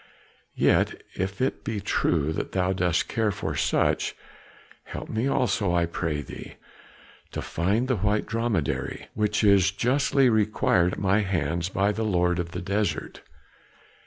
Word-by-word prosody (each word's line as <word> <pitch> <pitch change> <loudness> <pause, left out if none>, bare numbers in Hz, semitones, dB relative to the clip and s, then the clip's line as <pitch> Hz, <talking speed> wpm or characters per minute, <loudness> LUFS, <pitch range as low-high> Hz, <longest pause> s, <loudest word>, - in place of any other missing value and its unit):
Yet - - +2
if 95 +4 -3
it 130 - -1
be 110 -2 -3
true 80 -6 0
that - - -4
thou 95 0 +1
dost 90 -3 +1
care 110 -2 0
for 100 0 -3
such, - - +1 0.7
help - - -7
me 115 +4 -1
also, 100 -8 +1
I 85 -1 +3
pray 80 -3 -2
thee, - - -10 0.8
to - - -3
find 100 +9 0
the 130 -3 +1
white 105 +2 +1
dromedary, 115 - -2
which 105 +1 0
is 100 -2 +5
justly 130 +6 +2
required 105 -5 +2
at - - -5
my 100 +1 +2
hands 85 -3 -1
by 100 +2 +1
the 110 - -4
lord 90 -4 +1
of 85 -1 -2
the 90 +1 -5
desert." 100 +1 -2
100 Hz, 150 wpm, -26 LUFS, 90-110 Hz, 0.8 s, is